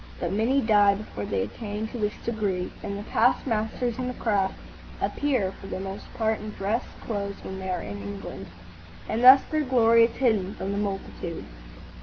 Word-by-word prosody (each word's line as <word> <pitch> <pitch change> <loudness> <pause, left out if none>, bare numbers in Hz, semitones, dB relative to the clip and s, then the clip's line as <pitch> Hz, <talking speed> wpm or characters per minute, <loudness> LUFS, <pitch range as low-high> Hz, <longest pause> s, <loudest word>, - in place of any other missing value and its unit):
But - - -2
many 240 +7 +2
die 205 -3 +5
before 195 - -6
they 95 -1 0
attain 210 - -4
to 240 - -6
this 210 -1 0
degree, 205 -6 -1
and 200 - -4
the 205 - -6
past 240 +4 +2
masters 230 +1 -1
in 250 - -1
the 250 - -4
craft 200 -4 +1 0.4
appear 255 -10 0
for 195 - -11
the - - -4
most 195 +1 -7
part 220 -1 +1
in 215 - -6
dress 210 +3 -1 0.2
clothes 200 -3 -4
when 190 0 -6
they 190 0 -5
are 180 -2 -2
in 100 0 -6
England, 100 0 -7 0.6
and 225 +2 -1
thus 260 +2 +10
their 310 0 +2
glory 230 -4 +5
is 230 - -4
hidden 215 -7 +1
from 195 - -3
the 200 - -1
multitude. 195 -4 -4
210 Hz, 190 wpm, -26 LUFS, 195-230 Hz, 0.6 s, thus